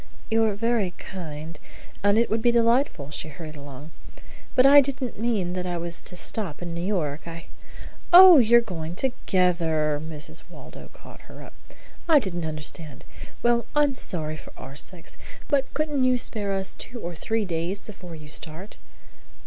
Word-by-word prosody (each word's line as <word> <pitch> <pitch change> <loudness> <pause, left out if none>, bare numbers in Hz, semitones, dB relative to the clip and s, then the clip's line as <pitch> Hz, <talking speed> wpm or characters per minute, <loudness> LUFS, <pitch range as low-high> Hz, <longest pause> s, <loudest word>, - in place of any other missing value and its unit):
"You're 220 -2 +2
very 220 -4 0
kind, 160 -3 -8 0.4
and 205 +1 +4
it 235 - +3
would 220 +1 +1
be 240 - +4
delightful," 235 - +1
she 150 - -3
hurried 155 +1 -9
along, 145 +1 -10 0.6
"but 255 - +5
I 285 +1 +9
didn't 260 -5 -3
mean 215 -6 -1
that 180 0 -3
I 175 -1 -2
was 170 0 -4
to 180 - -4
stop 180 -3 0
in 170 -1 -5
New 170 - -4
York. 170 -6 -2
I 165 0 -8 0.3
" - - -11 0.3
"Oh, 360 -3 +10
you 235 0 +6
are - - +5
going 170 -7 -6
together!" 170 - 0
Mrs. 155 -2 -7
Waldo - - -12
caught - - -15
her - - -11
up. - - -13 0.6
"I 315 - +7
didn't 180 - -1
understand. 155 -1 -6 0.4
Well, 240 0 +2
I'm 295 -1 +3
sorry 155 -10 -2
for - - -12
our 135 +1 -10
sakes. 170 +4 -9 0.3
But 275 -2 +1
couldn't 300 -3 0
you 255 0 +3
spare 215 -4 -2
us 190 -1 -2
two 245 - -9
or 175 -4 -5
three 220 +6 -2
days 175 +3 -3
before 180 -5 -10
you 155 -1 -11
start?" 160 +6 -4
185 Hz, 175 wpm, -25 LUFS, 160-235 Hz, 0.6 s, Oh